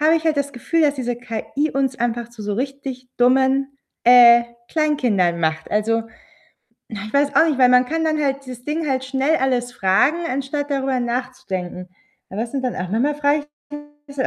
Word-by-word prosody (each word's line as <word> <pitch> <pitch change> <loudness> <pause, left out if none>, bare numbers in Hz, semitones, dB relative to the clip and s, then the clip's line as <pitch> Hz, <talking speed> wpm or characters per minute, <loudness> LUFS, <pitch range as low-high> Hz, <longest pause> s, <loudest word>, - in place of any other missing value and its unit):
habe 310 +2 +4
ich 325 - -4
halt 315 -2 +1
das 280 0 -2
Gefühl, 320 +6 -1
dass 290 -1 +3
diese 245 -3 -3
KI 245 +5 -3
uns 270 -2 -1
einfach 235 0 -2
zu 235 -3 -11
so 205 0 -3
richtig 265 0 -5
dummen, 265 +2 +2 0.3
äh, 240 -1 +8 0.3
Kleinkindern 245 - +1
macht. 160 0 -2
Also, 225 +2 +1 0.9
na, 215 -3 -7
ich - - -10
weiß 280 0 +1
auch 325 - +6
nicht, 295 -4 0
weil 250 -1 +6
man 250 0 +5
kann 320 +3 -1
dann 310 -1 0
halt 275 -1 -1
dieses 250 -2 -10
Ding 305 +1 -2
halt 260 -1 -1
schnell 270 +4 +1
alles 250 -2 -1
fragen, 245 - +2
anstatt 280 +3 -3
darüber 270 -2 0
nachzudenken. 235 -8 -4 0.4
Aber 200 +3 -5
das 235 - -3
sind 270 0 -3
dann 250 - -1
auch 180 -1 -4
manchmal 245 +9 0
frage 295 0 0 0.6
ich 280 -1 -2
260 Hz, 190 wpm, -20 LUFS, 235-285 Hz, 0.9 s, äh